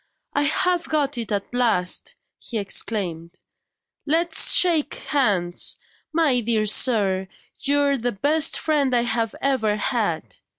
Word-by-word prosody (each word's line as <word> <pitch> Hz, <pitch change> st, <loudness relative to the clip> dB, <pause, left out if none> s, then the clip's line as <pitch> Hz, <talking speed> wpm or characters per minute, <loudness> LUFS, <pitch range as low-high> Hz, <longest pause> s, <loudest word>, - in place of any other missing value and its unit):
"I 290 Hz, -, +1 dB
have 340 Hz, +4 st, 0 dB
got 290 Hz, -4 st, 0 dB
it 230 Hz, -1 st, -5 dB
at 200 Hz, +3 st, -3 dB
last!" 225 Hz, -8 st, 0 dB, 0.2 s
he 235 Hz, -, -6 dB
exclaimed. 185 Hz, -4 st, -2 dB, 0.7 s
"Let's 325 Hz, +2 st, +2 dB
shake 330 Hz, -5 st, +2 dB
hands. 200 Hz, -, 0 dB, 0.3 s
My 310 Hz, -6 st, +2 dB
dear 220 Hz, -2 st, 0 dB
sir, 200 Hz, -4 st, +2 dB, 0.3 s
you're 285 Hz, 0 st, +1 dB
the 245 Hz, 0 st, -2 dB
best 295 Hz, +9 st, +2 dB
friend 285 Hz, -5 st, 0 dB
I 240 Hz, -, +2 dB
have 225 Hz, -2 st, -1 dB
ever 245 Hz, -7 st, +1 dB
had!" 200 Hz, -, -2 dB
240 Hz, 125 wpm, -22 LUFS, 205-290 Hz, 0.7 s, Let's